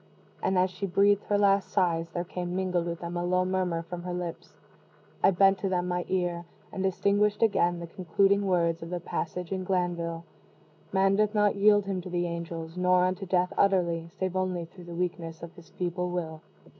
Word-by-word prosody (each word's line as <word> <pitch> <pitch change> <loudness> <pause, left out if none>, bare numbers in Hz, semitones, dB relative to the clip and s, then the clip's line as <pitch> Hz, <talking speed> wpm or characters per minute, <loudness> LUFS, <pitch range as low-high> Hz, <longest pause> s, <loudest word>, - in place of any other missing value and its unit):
And 190 - +1
as 180 0 +3
she 195 +2 -4
breathed 200 +2 +3
her 205 - +1
last 200 -1 +3
sighs, 170 -3 +1
there 175 +1 -3
came 175 0 -5
mingled 180 -2 0
with 170 0 -4
them 170 0 -5
a 175 - -1
low 180 +1 +2
murmur 185 -3 -1
from 175 +1 -7
her 180 0 -4
lips. 175 -2 -6 0.6
I - - +6
bent 195 +1 +4
to 195 - -1
them 180 -1 0
my 180 0 -1
ear, 175 -2 -1 0.3
and 190 - -4
distinguished, 200 +3 +2
again, 175 -5 +2
the 170 - -5
concluding 195 +3 +1
words 170 -3 +1
of 165 - -7
the 180 0 -3
passage 175 +1 -4
in 190 -1 -2
Glanvill: 175 -3 -1 0.7
"_Man 195 0 +3
doth 215 0 +2
not 210 -1 +3
yield 205 0 +4
him 195 -2 -2
to 180 - -8
the 175 0 -1
angels, 170 0 -5
nor 180 0 +4
unto 185 +1 -2
death 180 0 +1
utterly, 170 -4 +2
save 185 -1 -2
only 185 -2 -1
through 175 +1 -14
the 170 0 -8
weakness 170 -2 -4
of 170 - -8
his 170 -2 -16
feeble 180 0 -3
will. 160 -3 -4
180 Hz, 200 wpm, -28 LUFS, 170-190 Hz, 0.7 s, I